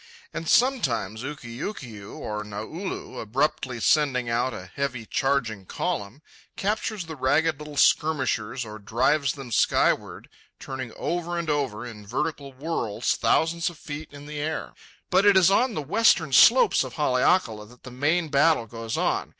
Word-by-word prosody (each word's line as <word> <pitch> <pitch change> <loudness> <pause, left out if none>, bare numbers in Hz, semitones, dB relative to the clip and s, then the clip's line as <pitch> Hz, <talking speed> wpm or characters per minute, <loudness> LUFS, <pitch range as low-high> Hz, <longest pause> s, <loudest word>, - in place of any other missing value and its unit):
And 165 0 -5
sometimes 125 - +2
Ukiukiu 125 - -7
or 105 0 -4
Naulu, 110 - -6
abruptly 130 +1 -1
sending 130 -3 +2
out 120 +2 +1
a 90 - -7
heavy 125 +4 -4
charging 115 -8 -1
column, 105 +9 -3 0.3
captures 210 -1 -2
the 160 -1 -7
ragged 145 +3 +1
little 150 -1 -9
skirmishers 130 -7 +2
or 110 0 -9
drives 130 +6 +1
them 135 -4 -9
skyward, - - +1 0.3
turning 130 -3 -6
over 175 0 -2
and 165 -2 -1
over, 130 -6 -2
in 105 -4 -10
vertical 140 +3 -3
whirls, 130 -6 -1
thousands 165 +1 +1
of 175 - -13
feet 150 -1 -7
in 145 0 -11
the 150 0 -6
air. 155 +2 -3 0.4
But 185 +2 +4
it 205 -1 +6
is 190 0 +6
on 235 +3 +2
the 150 - -2
western 220 +11 +3
slopes - - +6
of - - -8
Haleakala 125 - +1
that 125 +3 -19
the 125 - -9
main 155 +6 0
battle 145 -2 +3
goes 115 0 -5
on. - - 0
140 Hz, 150 wpm, -25 LUFS, 115-160 Hz, 0.4 s, it